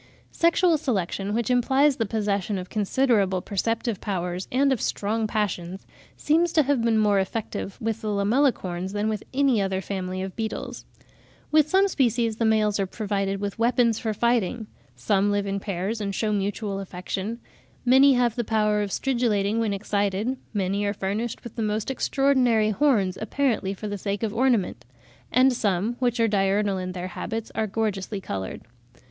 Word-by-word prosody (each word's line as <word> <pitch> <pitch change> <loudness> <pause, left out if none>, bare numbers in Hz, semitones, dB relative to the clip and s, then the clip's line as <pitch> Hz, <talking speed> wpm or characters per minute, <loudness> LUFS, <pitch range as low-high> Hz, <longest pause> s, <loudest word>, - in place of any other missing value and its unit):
Sexual 335 -1 +3
selection, 200 - -2
which 235 +1 0
implies 265 +3 +3
the 225 - -1
possession 205 -2 -1
of 180 0 -7
considerable 210 -3 +2
perceptive 225 +3 -2
powers 180 -2 -3
and 270 +2 +3
of 245 - -3
strong 215 +2 -1
passions, 190 -4 -3 0.3
seems 330 +3 +2
to 310 - +5
have 280 -2 +1
been 230 -1 +2
more 205 -2 +3
effective 195 0 -4
with 225 0 -2
the 215 - -4
Lamellicorns 200 -4 0
than 210 +1 0
with 215 -1 -2
any 265 -5 +2
other 190 -1 -1
family 185 -1 -4
of 190 -1 -6
beetles. 220 -1 -5 0.7
With 305 -1 +4
some 385 +3 +4
species 235 - +1
the 230 - +1
males 215 -2 +2
are 195 - 0
provided 195 -1 -2
with 200 +1 -4
weapons 235 -1 +2
for 220 - -2
fighting; 235 0 0 0.3
some 195 +11 +1
live 205 0 0
in 200 0 -2
pairs 195 +3 -3
and 200 -1 -3
shew 215 -2 0
mutual 200 0 -2
affection; 195 +4 -5 0.5
many 265 +3 +6
have 245 -2 +2
the 240 - -1
power 210 -1 +1
of 205 - -2
stridulating 225 -3 0
when 225 -2 0
excited; 200 +3 -1 0.2
many 200 -1 -1
are 205 0 -1
furnished 210 +5 -3
with 235 - -9
the 230 - -3
most 215 +3 -1
extraordinary 255 -5 +2
horns, 210 -7 +2
apparently 225 -4 0
for 210 - -6
the 205 -1 -4
sake 200 +2 -3
of 215 -2 -1
ornament; 225 - +1 0.5
and 255 +1 +5
some, 205 -1 0
which 245 -2 0
are 230 - +4
diurnal 200 -1 +1
in 185 0 -4
their 180 0 -5
habits, 225 +5 -5
are 220 -1 -1
gorgeously 205 -1 -2
coloured. 95 - -5
215 Hz, 170 wpm, -25 LUFS, 195-235 Hz, 0.7 s, many